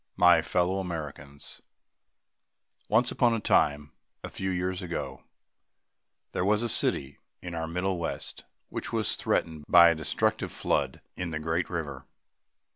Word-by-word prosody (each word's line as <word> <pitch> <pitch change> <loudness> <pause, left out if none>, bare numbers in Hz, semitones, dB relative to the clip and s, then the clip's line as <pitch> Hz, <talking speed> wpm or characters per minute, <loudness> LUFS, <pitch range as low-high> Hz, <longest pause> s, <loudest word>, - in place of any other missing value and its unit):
My 90 -2 +6
Fellow 90 +3 0
Americans: 75 -5 -7 1.3
Once 120 +3 +3
upon 120 -2 +3
a - - -1
time, 75 -7 +2 0.3
a - - -5
few 95 - -3
years 90 +1 -2
ago, 70 -8 -5 1.1
there - - -1
was 105 +3 +2
a 120 - 0
city 70 -9 +3 0.2
in 90 -1 -7
our 80 -1 -3
Middle 90 +2 -1
West 85 - -4 0.3
which - - -4
was - - 0
threatened 80 -2 -1
by 85 -1 +8
a - - +3
destructive 80 -1 -1
flood - - -1
in 90 - -4
the 80 - -3
great 80 +2 -1
river. 75 -6 -5
85 Hz, 140 wpm, -28 LUFS, 75-90 Hz, 1.3 s, by